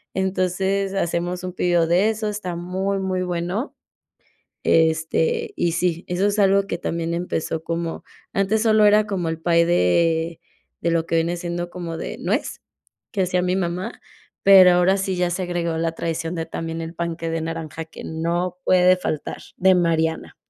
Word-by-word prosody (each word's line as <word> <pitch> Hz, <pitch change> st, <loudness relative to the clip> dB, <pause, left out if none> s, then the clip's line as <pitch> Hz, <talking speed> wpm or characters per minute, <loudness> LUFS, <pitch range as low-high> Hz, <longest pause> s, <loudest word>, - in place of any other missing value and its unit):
Entonces 190 Hz, +1 st, 0 dB
hacemos 175 Hz, 0 st, -1 dB
un 180 Hz, -1 st, -5 dB
pedido 175 Hz, -2 st, +2 dB
de 185 Hz, +6 st, +3 dB
esos, 215 Hz, -1 st, -2 dB
está 185 Hz, -4 st, -4 dB
muy, 190 Hz, +3 st, -2 dB
muy 185 Hz, -1 st, -1 dB
bueno, 180 Hz, -, -3 dB, 0.9 s
este, 160 Hz, 0 st, +2 dB
y 170 Hz, -, +1 dB
sí, 170 Hz, 0 st, -1 dB
eso 180 Hz, +3 st, +1 dB
es 205 Hz, +1 st, 0 dB
algo 195 Hz, 0 st, +4 dB
que 170 Hz, -, -3 dB
también 170 Hz, -1 st, -2 dB
empezó 165 Hz, -2 st, -2 dB
como 165 Hz, 0 st, -4 dB, 0.3 s
antes 195 Hz, +3 st, +1 dB
solo 215 Hz, -2 st, +4 dB
era 210 Hz, +1 st, +5 dB
como 185 Hz, -5 st, -2 dB
el 160 Hz, 0 st, -3 dB
pay 170 Hz, 0 st, +3 dB
de 165 Hz, -, +2 dB, 0.4 s
de 170 Hz, -, 0 dB
lo 165 Hz, -1 st, +1 dB
que -, -, -2 dB
viene 170 Hz, +2 st, +1 dB
siendo 175 Hz, 0 st, -4 dB
como 170 Hz, -2 st, -5 dB
de -, -, -5 dB
nuez, -, -, -2 dB, 0.5 s
que 195 Hz, -, 0 dB
hacía 180 Hz, 0 st, +1 dB
mi 180 Hz, 0 st, +1 dB
mamá, 180 Hz, 0 st, -3 dB, 0.4 s
pero 190 Hz, -2 st, +8 dB
ahora 180 Hz, +2 st, +4 dB
sí 190 Hz, -1 st, -1 dB
ya 180 Hz, 0 st, +1 dB
se 185 Hz, +2 st, -2 dB
agregó 170 Hz, -2 st, -2 dB
la 165 Hz, 0 st, 0 dB
traición 165 Hz, +1 st, -3 dB
de 165 Hz, -1 st, -3 dB
también 165 Hz, 0 st, -5 dB
el 165 Hz, +1 st, -6 dB
panqué 165 Hz, -1 st, -3 dB
de 165 Hz, -1 st, -2 dB
naranja 160 Hz, -1 st, -5 dB
que -, -, -11 dB
no 170 Hz, +3 st, -2 dB
puede 185 Hz, 0 st, +5 dB
faltar, 155 Hz, -4 st, -4 dB, 0.2 s
de 190 Hz, 0 st, +5 dB
Mariana, 160 Hz, -2 st, 0 dB
175 Hz, 175 wpm, -22 LUFS, 165-185 Hz, 0.9 s, pero